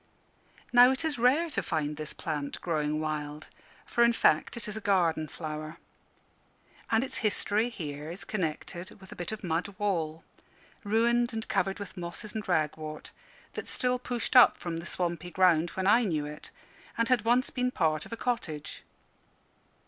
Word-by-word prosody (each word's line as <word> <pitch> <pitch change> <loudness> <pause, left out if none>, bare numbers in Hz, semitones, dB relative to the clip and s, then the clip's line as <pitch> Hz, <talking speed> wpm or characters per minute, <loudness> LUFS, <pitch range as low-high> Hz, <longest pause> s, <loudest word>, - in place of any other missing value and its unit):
Now, 245 +1 +9
it 265 +5 -1
is 300 -6 -1
rare 270 +8 +4
to - - 0
find 150 -3 -2
this 155 0 -6
plant 150 -3 -4
growing 155 -3 -1
wild; 150 -1 -4 0.4
for, 235 - +2
in 235 0 +5
fact, 235 - +3
it 235 - -4
is 210 - -5
a 220 - -5
garden 170 -6 +2
flower. 155 0 -6 1.1
And 225 +2 +3
its 265 - -5
history 215 +1 +1
here 150 -8 -6
is 175 +4 -7
connected 175 -1 -4
with 190 -1 -14
a - - -8
bit 175 +1 -4
of 220 -1 -6
mud 170 0 0
wall, 165 -6 -1 0.6
ruined 235 +3 +2
and 220 0 -4
covered 195 0 0
with 200 -2 -8
mosses 180 +5 -6
and 215 -1 -4
ragwort, 155 -2 -2 0.4
that - - -6
still 250 0 0
pushed 245 0 -3
up 250 - +8
from 170 -2 -4
the 170 +1 -6
swampy 175 -1 -2
ground 175 -2 +4
when 190 - 0
I 210 +5 +6
knew 160 -8 0
it, 150 +1 -8 0.5
and 230 0 +2
had 250 -2 +3
once 245 +3 +3
been 250 -1 0
part 155 -9 +1
of - - -12
a 230 - -4
cottage. 160 -13 -3
185 Hz, 170 wpm, -29 LUFS, 155-230 Hz, 1.1 s, Now